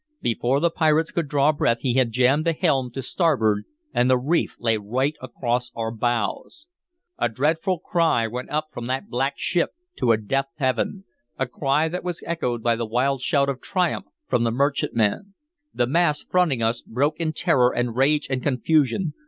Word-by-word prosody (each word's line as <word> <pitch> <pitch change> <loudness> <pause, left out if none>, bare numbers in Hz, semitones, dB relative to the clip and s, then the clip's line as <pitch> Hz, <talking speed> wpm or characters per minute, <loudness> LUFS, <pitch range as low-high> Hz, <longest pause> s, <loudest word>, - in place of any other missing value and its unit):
Before 120 +3 +1
the 170 +2 +2
pirates 160 0 +2
could 170 -3 -2
draw 145 +1 +3
breath 120 -5 0
he 130 -3 0
had 130 -2 +3
jammed 130 +5 +3
the 165 0 +1
helm 140 -7 +1
to 135 - -4
starboard, 115 - +1 0.3
and 125 +1 +2
the 130 - +5
reef 150 +7 0
lay 115 -2 +2
right 130 +8 -1
across 125 -1 -2
our 115 -1 -2
bows. 120 - -2 0.5
A - - +2
dreadful 160 - 0
cry 165 -8 +1
went 125 +3 -5
up 155 +1 -2
from 120 -1 -6
that 130 +1 -3
black 135 +3 0
ship 175 -1 0 0.2
to 120 - +2
a 110 - +4
deaf 135 +6 -1
Heaven, 130 - -1 0.3
a 130 - 0
cry 140 +4 0
that 180 +3 -4
was 175 -2 -4
echoed 125 -9 -2
by 120 - +3
a 115 +1 -2
wild 125 +4 0
shout 140 +1 +2
of 135 -2 -3
triumph 185 +1 -1 0.2
from 120 - +1
the 115 - +2
merchantman. 140 - 0 0.4
The 120 - +1
mass 150 +2 +1
fronting 165 -10 +1
us 115 +1 0
broke 145 +7 -1
in 160 -2 0
terror 140 -7 +3
and 120 -2 -2
rage 145 +3 +2
and 130 -1 -2
confusion. 145 +4 +1
135 Hz, 185 wpm, -23 LUFS, 120-155 Hz, 0.5 s, the